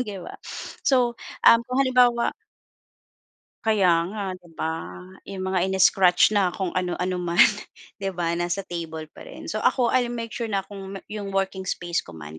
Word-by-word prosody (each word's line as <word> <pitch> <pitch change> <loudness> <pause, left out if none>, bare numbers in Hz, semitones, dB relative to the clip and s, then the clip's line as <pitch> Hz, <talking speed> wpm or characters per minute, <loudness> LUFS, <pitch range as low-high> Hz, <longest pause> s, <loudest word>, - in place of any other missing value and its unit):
'di 210 -5 -4
ba? - - -8 0.5
So, 250 -3 +3 0.3
um, 230 - +8
kung 255 - -2
halimbawa 245 -2 +3 1.3
Kaya 185 -6 +3
nga 205 +2 -5
'di 175 -2 -19
ba 160 - -2 0.6
'yong 195 -1 -6
mga 185 -1 +1
ini-scratch 190 -1 +4
na 195 -4 +2
kung 190 -3 -2
ano-ano 180 0 -2
man. 175 0 +4 0.6
'Di 195 -1 -3
ba 170 -1 -1
nasa 175 +3 -1
table 160 -3 -6
pa - - -13
rin. - - -8
So - - -2
ako 245 -3 +2
l'll 240 -1 +1
make 230 -1 -5
sure 235 0 -3
na 200 -3 -1
kung 195 0 -9 0.2
'yong 205 -2 -5
working 190 -1 -1
space 175 -1 -2
ko 85 - -11
man 75 0 -9
190 Hz, 170 wpm, -24 LUFS, 175-220 Hz, 1.3 s, um